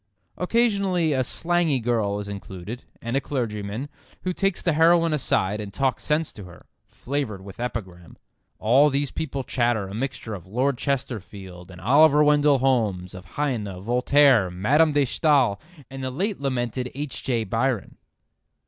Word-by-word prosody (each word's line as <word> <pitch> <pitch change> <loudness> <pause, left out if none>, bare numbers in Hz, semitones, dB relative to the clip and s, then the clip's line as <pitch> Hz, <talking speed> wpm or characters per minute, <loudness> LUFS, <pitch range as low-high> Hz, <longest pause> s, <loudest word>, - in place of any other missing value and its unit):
Occasionally 195 -6 +1
a 130 -1 +1
slangy 165 0 +1
girl 110 -4 0
is 100 - -6
included, 100 +3 -7 0.2
and 115 +2 -2
a 135 - +2
clergyman, 110 -2 -3 0.4
who 185 - -1
takes 195 0 -1
the 170 - +2
heroine 165 +1 +4
aside 105 -7 0
and 100 -1 -7
talks 130 +2 -1
sense 155 +1 0
to 100 - -10
her, 85 -2 -14 0.2
flavoured 125 -8 -4
with 100 +2 -11
epigram. 95 -8 -6 0.4
All 130 +7 +4
these 140 -1 -1
people 140 -3 -4
chatter 120 -6 0
a 95 - -8
mixture 115 -1 -4
of 90 -3 -8
Lord 125 +5 0
Chesterfield 100 -10 -4
and 90 -1 -12
Oliver 145 - +5
Wendell 145 -1 +4
Holmes, 110 -9 0
of 90 0 -10
Heine, 110 -10 -2
Voltaire, 125 0 +4
Madame 135 - +3
de 145 -1 +3
Stael, 135 -7 +2 0.3
and 135 0 -8
the 130 - -1
late 190 - -2
lamented 125 -2 -2
H. 145 0 -5
J. 120 -4 0
Byron. 115 +2 -1
125 Hz, 155 wpm, -24 LUFS, 105-145 Hz, 0.4 s, Oliver